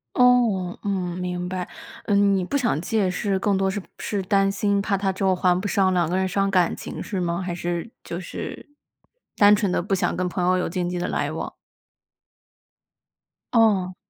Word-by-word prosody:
哦， 235 -8 +3
嗯， 180 -3 -2
明 180 0 -3
白。 180 -1 -4 0.4
嗯， 200 -1 +3
你 185 - 0
不 280 - -2
想 240 - +1
借 200 0 0
是 195 +1 -1
更 200 -2 +1
多 195 0 +1
是 200 +1 -2
不 - - -16
是 205 -2 -2
担 195 +1 +2
心 200 0 +1
怕 200 0 0
他 195 0 0
之 190 +1 -3
后 190 -1 +4
还 180 0 +2
不 205 - -4
上， 195 -2 +2
两 175 -3 +2
个 180 - 0
人 190 0 +1
伤 195 +1 +1
感 180 -3 +2
情 - - -6
是 195 -4 -3
吗？ 175 +1 -1
还 180 -1 -3
是 175 +4 -3
就 170 - -5
是， 190 - -7 0.7
单 205 0 +7
纯 205 -4 0
地 - - +1
不 195 +3 -5
想 190 - +1
跟 180 0 -1
朋 175 0 -1
友 185 0 +3
有 180 - -1
经 175 +1 -2
济 180 0 -3
的 175 - -2
来 - - -1
往？ - - -5 2.0
哦。 200 -5 +3
190 Hz, 215 characters per minute, -24 LUFS, 180-200 Hz, 2.0 s, 单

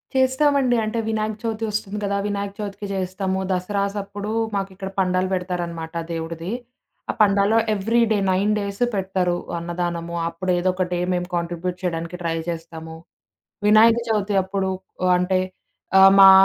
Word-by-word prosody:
చేస్తామండి. 260 0 +3
అంటే 215 +2 -1
వినాయక 220 -1 -1
చవితి 225 -1 -2
వస్తుంది 210 -1 -3
గదా! 200 0 0
వినాయక 200 -1 -3
చవితికి 205 0 -5
చేస్తాము. 190 0 -2
దసరాసప్పుడు 200 +2 -2 0.3
మాకిక్కడ 195 0 -4
పండాలు 185 0 +2
పెడతారనమాట 175 -3 -3 0.2
దేవుడిది. 165 +2 -4 0.6
ఆ - - -7
పండాలో 200 +1 +4 0.2
ఎవ్రీ 220 +4 +1
డే 215 - +4
9 195 +3 +2
డేసు 200 +3 -1
పెడతారు 190 -2 0 0.2
అన్నదానము. 170 0 -3
అప్పుడు 180 +2 -2
ఏదో 185 +1 +1
ఒక 185 - +1
డే 175 - 0
మేము 180 0 -1
కాంట్రిబ్యూట్ 175 +1 -2
చేయడానికి 170 -1 -2
ట్రై 165 -1 -1
జేస్తాము. 165 -1 -6 0.7
వినాయక 220 +2 +6
చవితి 210 -2 0
అప్పుడు 190 0 -2 0.5
అంటే 185 +1 +1 0.6
ఆహ్, 195 0 +9
మా 195 0 +11
190 Hz, 135 wpm, -22 LUFS, 175-205 Hz, 0.7 s, మా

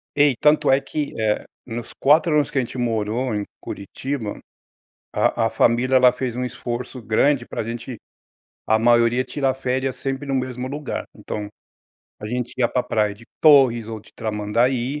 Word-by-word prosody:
E 145 -3 +4
tanto 150 -1 +4
é 135 - +5
que, 145 +1 -4
eh, 105 -1 0 0.2
nos 120 -1 -6
4 155 +3 +4
anos 145 -2 +2
que - - -5
a - - +4
gente 125 - -6
morou 115 +1 -1
em 105 - -1 0.2
Curitiba, 110 +2 -5 0.7
a 115 -1 +1
a - - 0
família, 125 +3 +3
ela 125 -1 +6
fez 125 -3 -3
um 125 - -1
esforço 125 +1 -5
grande 120 +4 +2
pra - - -4
gente, 115 +2 -6 0.7
a 110 - +3
maioria 120 +2 +3
tira 135 -2 -1
férias 130 0 -2
sempre 135 +1 -4
no 135 - -1
mesmo 130 -1 -2
lugar. 145 0 -4
Então, 105 -1 -5 0.7
a 105 - -6
gente 125 +2 -3
ia 120 - +4
para 125 - 0
praia 105 -2 0
de 110 +4 -16 0.2
Torres 130 -7 +6
ou 110 -1 -6
de - - -20
Tramandaí. 120 +6 0
125 Hz, 170 wpm, -22 LUFS, 115-135 Hz, 0.7 s, ela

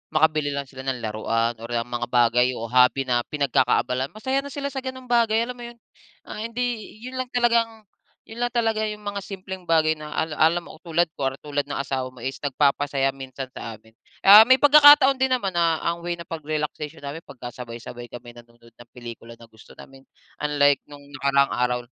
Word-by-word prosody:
makabili 155 -2 +2
lang 140 - -2
sila 135 0 -10
ng 125 -3 -3
laruan 115 +2 -1
or, 115 - -8
um, 115 0 -1
mga 120 0 -3
bagay 120 0 +3
o 115 0 -6
hobby 125 +2 +4
na 125 -2 +1
pinagkakaabalahan, 130 -2 0
masaya 260 +5 -1
na 280 - -6
sila 280 0 -5
sa 270 - -4
ganong 260 -1 -8
bagay 230 -1 +3
alam 250 +1 -6
mo 240 - -7
yun? 240 - -12 0.5
Ang - - -9
hindi 245 -3 -2 0.2
yun 255 +1 -6
lang 255 - -2
talagang 230 -2 +1 0.4
yun 225 +2 -11
lang 245 0 -2
talaga 220 -2 +1
yung 210 0 -7
mga 205 0 -4
simpleng 190 -2 -8
bagay 160 -1 +2
na 150 - -8
ala 160 -2 -2
alam 170 +2 +3
mo 160 - -13
tulad 170 -1 0
ko 135 -1 -1
tulad 145 -1 -2
ng 145 - -4
asawa 135 -1 -2
mo 125 -2 -13
is 135 +1 -4
nagpapasaya 140 -1 +1
minsan 135 -1 -8
sa 115 -3 -7
amin. 110 +1 -22 0.3
Ah, 210 +3 +10
may 260 - +7
pagkakataon 290 -1 +7
din 265 - +3
naman 245 -7 0
na 170 -2 +1
ang 170 0 -1
way 175 0 -3
ng 170 -1 -11
pag-relaxation 155 0 -4
namin 145 +3 -6
pagkasabay-sabay 120 -1 -9
kami 120 0 -11
nanonood 120 0 -18
ng 120 +1 -17
pelikula 115 -1 -10
na 115 - -17
gusto 110 - -17
namin, 135 0 -15 0.3
unlike 145 -2 +2
nung 145 -1 -13 0.2
nakaraang 140 0 +2
araw 125 0 0
150 Hz, 195 wpm, -23 LUFS, -, 0.5 s, Ah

